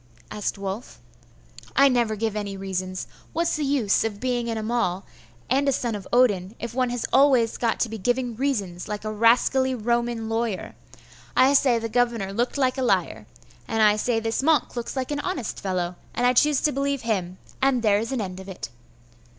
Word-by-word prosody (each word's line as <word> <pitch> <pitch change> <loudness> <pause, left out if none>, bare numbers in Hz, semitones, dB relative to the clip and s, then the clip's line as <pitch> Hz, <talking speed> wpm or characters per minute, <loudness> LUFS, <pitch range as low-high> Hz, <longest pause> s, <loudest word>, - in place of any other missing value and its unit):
asked 210 0 -3
Wulf. 200 +4 -6 0.8
'I 275 - +7
never 240 -4 +1
give 220 0 -2
any 200 -2 -4
reasons. 185 -1 -4 0.3
What's 335 +1 +1
the 305 - -2
use 270 -8 +2
of 215 -2 -3
being 245 -1 -1
an 225 - -2
Amal, 215 -4 -1 0.4
and 275 +2 +2
a - - +3
son 240 -3 -1
of 200 -3 -6
Odin, 215 -5 +2
if 235 -1 -6
one 255 0 +1
has 245 -1 -2
always 260 -4 +4
to 235 0 0
be 220 0 -7
giving 245 +3 0
reasons 205 -9 -2
like 210 0 -5
a 215 - -2
rascally 250 +4 +3
Roman 235 0 -1
lawyer? 225 -3 -2 0.6
I 265 +2 +6
say 265 -3 +4
the 230 0 -3
governor 230 -4 0
looked 240 +6 -1
like 260 -1 +1
a - - 0
liar; 245 - 0 0.4
and 225 -1 +1
I 210 -1 +6
say 225 +2 0
this 225 +2 -1
monk 310 -1 +2
looks 240 +2 -4
like 260 +1 -3
an 290 - -1
honest 290 - -3
fellow; 180 -2 -2 0.2
and 245 - +1
I 250 - +4
choose 295 +2 +3
to 300 - +2
believe 275 -1 -1
him, 185 -5 -2 0.2
and 265 -3 +2
there 205 -2 +4
is 225 +4 -4
an 260 -4 -1
end 185 -2 -5
of 190 +1 -10
it. 115 -11 -7
235 Hz, 195 wpm, -24 LUFS, 205-255 Hz, 0.8 s, I